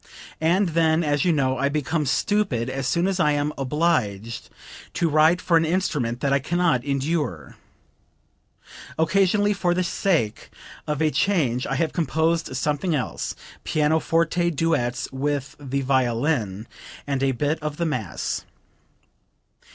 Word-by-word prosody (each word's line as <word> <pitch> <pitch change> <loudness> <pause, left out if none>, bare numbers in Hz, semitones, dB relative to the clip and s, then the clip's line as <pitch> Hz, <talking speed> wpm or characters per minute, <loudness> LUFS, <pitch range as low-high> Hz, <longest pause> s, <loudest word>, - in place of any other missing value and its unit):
And 175 +4 +3
then, 160 0 +2
as 145 -1 +1
you 180 - +4
know, 130 -4 +1
I 140 +1 +2
become 150 +1 -1
stupid 130 - 0
as 135 0 -3
soon 170 +5 +1
as 195 -1 0
I 150 -4 +3
am 145 +1 -1
obliged 125 - -1 0.5
to 170 - +1
write 155 +3 +4
for 170 -2 +3
an 165 - +3
instrument 150 -9 -1
that 140 -1 +1
I 140 - +3
can 170 +6 -2
not 165 -9 +2
endure. 140 - -2 1.4
Occasionally 195 +5 +3
for 180 -3 0
the 185 - +1
sake 170 - -1 0.4
of 150 +1 0
a 155 - +2
change 140 -13 +1
I 135 - -1
have 160 +3 0
composed 160 -2 0
something 150 +4 0
else 130 -5 -3 0.3
pianoforte 165 +3 +1
duets 140 -7 0
with 140 0 -2
the 140 -1 -2
violin, 120 -5 0 0.4
and 140 -2 -2
a 135 0 +2
bit 150 +5 -1
of 150 -1 -4
the 170 - 0
mass." 125 - -3
150 Hz, 145 wpm, -24 LUFS, 130-165 Hz, 1.4 s, you